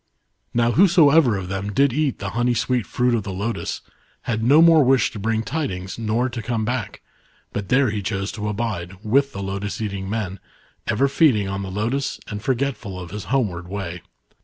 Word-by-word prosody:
" -, -, -50 dB
Now 120 Hz, 0 st, +3 dB
whosoever 160 Hz, -, +5 dB
of 95 Hz, -2 st, -5 dB
them 95 Hz, +2 st, -3 dB
did 140 Hz, +3 st, +3 dB
eat 145 Hz, -2 st, 0 dB
the 95 Hz, -1 st, -5 dB
honey 120 Hz, +2 st, +1 dB
sweet 120 Hz, 0 st, 0 dB
fruit 125 Hz, 0 st, +1 dB
of 115 Hz, -, +1 dB
the 100 Hz, -, -6 dB
lotus 105 Hz, +5 st, -3 dB, 0.4 s
had 110 Hz, -2 st, -2 dB
no 140 Hz, +6 st, +6 dB
more 165 Hz, -2 st, +7 dB
wish 130 Hz, -3 st, +3 dB
to 105 Hz, -, -7 dB
bring 110 Hz, +2 st, 0 dB
tidings 100 Hz, -11 st, -4 dB
nor 115 Hz, +3 st, 0 dB
to 120 Hz, -2 st, -5 dB
come 115 Hz, -1 st, -2 dB
back, 115 Hz, -4 st, -3 dB, 0.5 s
but 100 Hz, -1 st, -4 dB
there 130 Hz, -3 st, +3 dB
he 105 Hz, -1 st, -2 dB
chose 100 Hz, 0 st, -2 dB
to 105 Hz, -1 st, -4 dB
abide* 100 Hz, -4 st, -3 dB
with 135 Hz, +5 st, +3 dB
the 100 Hz, -, -6 dB
lotus 100 Hz, +1 st, -4 dB
eating 100 Hz, -3 st, -4 dB
men, 100 Hz, -3 st, -3 dB, 0.5 s
ever 120 Hz, +5 st, +2 dB
feeding 135 Hz, -, +3 dB
on 95 Hz, 0 st, -3 dB
the 95 Hz, -, -5 dB
lotus 115 Hz, +8 st, -2 dB
and 105 Hz, -1 st, -5 dB
forgetful 120 Hz, -7 st, -2 dB
of 90 Hz, -2 st, -8 dB
his 105 Hz, +1 st, -6 dB
homeward 100 Hz, -10 st, -1 dB
way. 90 Hz, -3 st, -5 dB
110 Hz, 195 wpm, -22 LUFS, 100-130 Hz, 0.5 s, more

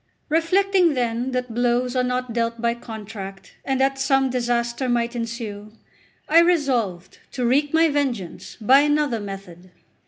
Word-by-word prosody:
Reflecting, 355 Hz, +1 st, +3 dB
then, 240 Hz, 0 st, -1 dB
that 250 Hz, -2 st, -3 dB
blows 245 Hz, +1 st, 0 dB
are 255 Hz, -, +3 dB
not 250 Hz, -1 st, -2 dB
dealt 230 Hz, 0 st, -1 dB
by 235 Hz, 0 st, +1 dB
contract, 210 Hz, -4 st, -9 dB
and 265 Hz, -1 st, -1 dB
that 270 Hz, 0 st, +1 dB
some 270 Hz, -1 st, +2 dB
disaster 240 Hz, +1 st, -1 dB
might 235 Hz, 0 st, 0 dB
ensue, 225 Hz, -3 st, -5 dB, 0.5 s
I 325 Hz, +2 st, +6 dB
resolved 250 Hz, -, 0 dB
to 250 Hz, -, -2 dB
wreak 280 Hz, +4 st, +2 dB
my 325 Hz, +1 st, +4 dB
vengeance 265 Hz, -, -3 dB
by 255 Hz, +5 st, +6 dB
another 295 Hz, -4 st, +1 dB
method. 195 Hz, -3 st, -9 dB
245 Hz, 145 wpm, -22 LUFS, 230-275 Hz, 0.5 s, I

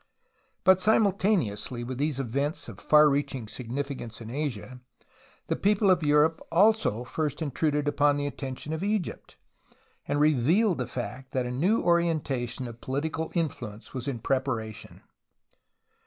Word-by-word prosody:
But 190 Hz, 0 st, +5 dB
simultaneously 185 Hz, -, +2 dB
with 125 Hz, +1 st, -5 dB
tliese 145 Hz, -2 st, 0 dB
events 140 Hz, +4 st, -2 dB
of -, -, -10 dB
far 150 Hz, 0 st, +6 dB
reaching 140 Hz, -4 st, -1 dB
signiflcance 125 Hz, +1 st, -5 dB
in 115 Hz, -1 st, -8 dB
Asia, 130 Hz, -3 st, -4 dB, 0.6 s
the -, -, -1 dB
people 205 Hz, -1 st, +3 dB
of 180 Hz, -, +3 dB
Europe 150 Hz, +2 st, +3 dB
also 190 Hz, -, +3 dB
first 145 Hz, +3 st, -3 dB
intruded 150 Hz, -1 st, 0 dB
upon 145 Hz, 0 st, +3 dB
the 145 Hz, -, -2 dB
atten 135 Hz, -2 st, -4 dB
tion 150 Hz, +4 st, -6 dB
of 160 Hz, -, -3 dB
Egypt, 205 Hz, -3 st, -3 dB, 0.7 s
and 145 Hz, -, 0 dB
revealed 155 Hz, -, +3 dB
the 125 Hz, -, -2 dB
fact 130 Hz, +1 st, -6 dB
that 130 Hz, -1 st, 0 dB
a 125 Hz, -, -3 dB
new 180 Hz, -, +2 dB
orientation 150 Hz, -8 st, 0 dB
of 115 Hz, 0 st, -10 dB
political 160 Hz, +4 st, -3 dB
influence 120 Hz, -10 st, -4 dB
was 130 Hz, -1 st, -5 dB
in 135 Hz, -4 st, -2 dB
preparation. 115 Hz, -3 st, -3 dB
145 Hz, 140 wpm, -27 LUFS, 125-160 Hz, 0.7 s, far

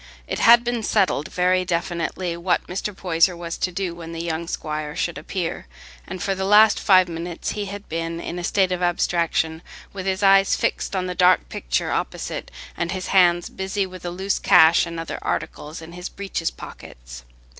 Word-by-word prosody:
It -, -, -4 dB
had 235 Hz, +1 st, +7 dB
been 240 Hz, -1 st, -1 dB
settled 195 Hz, -8 st, +1 dB
very 185 Hz, 0 st, +2 dB
definitely 175 Hz, 0 st, -2 dB
what 175 Hz, +1 st, 0 dB
Mr. 190 Hz, +3 st, -4 dB
Poyser 175 Hz, 0 st, +2 dB
was 170 Hz, -1 st, -5 dB
to 185 Hz, -, 0 dB
do 180 Hz, -1 st, -3 dB
when 170 Hz, -1 st, -9 dB
the 165 Hz, 0 st, -4 dB
young 165 Hz, 0 st, -3 dB
squire 150 Hz, -2 st, -4 dB
should 175 Hz, -2 st, -2 dB
appear, 170 Hz, -, -4 dB, 0.4 s
and 185 Hz, -1 st, -6 dB
for 195 Hz, -, 0 dB
the 190 Hz, 0 st, -3 dB
last 210 Hz, +2 st, +6 dB
five 185 Hz, -2 st, +5 dB
minutes 170 Hz, 0 st, -5 dB
he 210 Hz, -1 st, -3 dB
had 200 Hz, +1 st, -8 dB
been 165 Hz, +1 st, -3 dB
in 175 Hz, +1 st, -5 dB
a -, -, -6 dB
state 190 Hz, 0 st, +1 dB
of 180 Hz, 0 st, -2 dB
abstraction, 170 Hz, -2 st, 0 dB, 0.3 s
with 195 Hz, -1 st, -5 dB
his 190 Hz, +1 st, -1 dB
eyes 195 Hz, 0 st, +5 dB
fixed -, -, -2 dB
on 185 Hz, -1 st, -1 dB
the 180 Hz, -, -3 dB
dark 180 Hz, 0 st, +3 dB
picture -, -, -2 dB
opposite, -, -, -3 dB, 0.3 s
and 170 Hz, 0 st, -2 dB
his 185 Hz, -1 st, -4 dB
hands 175 Hz, -2 st, +4 dB
busy 195 Hz, +1 st, -2 dB
with 185 Hz, -1 st, -10 dB
the 175 Hz, -, -4 dB
loose 190 Hz, +3 st, -2 dB
cash 160 Hz, +2 st, +5 dB
and 170 Hz, 0 st, -6 dB
other 165 Hz, -, -5 dB
articles 155 Hz, +2 st, -4 dB
in 160 Hz, -, -11 dB
his 180 Hz, +1 st, -7 dB
breeches 195 Hz, -4 st, -3 dB
pockets. -, -, -11 dB
180 Hz, 190 wpm, -22 LUFS, 165-190 Hz, 0.4 s, had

